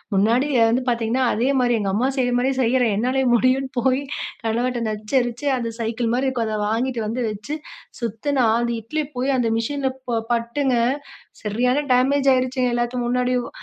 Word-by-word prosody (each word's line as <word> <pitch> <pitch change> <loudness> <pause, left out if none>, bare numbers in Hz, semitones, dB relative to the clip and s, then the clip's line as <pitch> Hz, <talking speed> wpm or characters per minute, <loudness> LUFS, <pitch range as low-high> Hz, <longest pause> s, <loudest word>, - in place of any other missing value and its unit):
முன்னாடி 230 +8 +3 0.2
அதுவந்து 230 +3 +2
பார்த்தீங்கன்னா. 235 +2 +1
அதேமாரி 250 +1 +2
எங்க 200 -2 -1
அம்மா 240 +5 +1
செய்யிறமாரி 245 0 +1
செய்றேன். 245 -2 +2
என்னாலே 255 +4 +1
முடியுன்னு 255 +3 +2
போயி 260 +2 +2 0.4
கணவர்ட்ட 240 +2 0
நச்சரிச்சு 240 +5 -1
அந்த 230 -2 -3
சைக்கிள் 230 0 -1
மாதிரி 260 +2 +1
இருக்கும் 240 -4 -2
அத 215 0 -2
வாங்கிட்டு 240 +2 -1
வந்து 235 +4 -2
வச்சு, 215 +8 -6 0.5
சுத்துனா 240 +4 0
அந்த 235 0 -1
இட்லி 305 +8 -2
போய் 265 +2 +1
அந்த 240 - +1
மிஷின்ல 275 +3 -1 0.2
ப 230 - +1
பட்டுங்க, 240 +3 0 0.7
சரியான 245 +6 +1
டேமேஜ் 275 +2 +3
ஆயிடுச்சுங்க 255 -1 0
எல்லாத்து 240 +1 -1
முன்னாடியும். 250 0 0
245 Hz, 150 wpm, -22 LUFS, 230-260 Hz, 0.7 s, முன்னாடி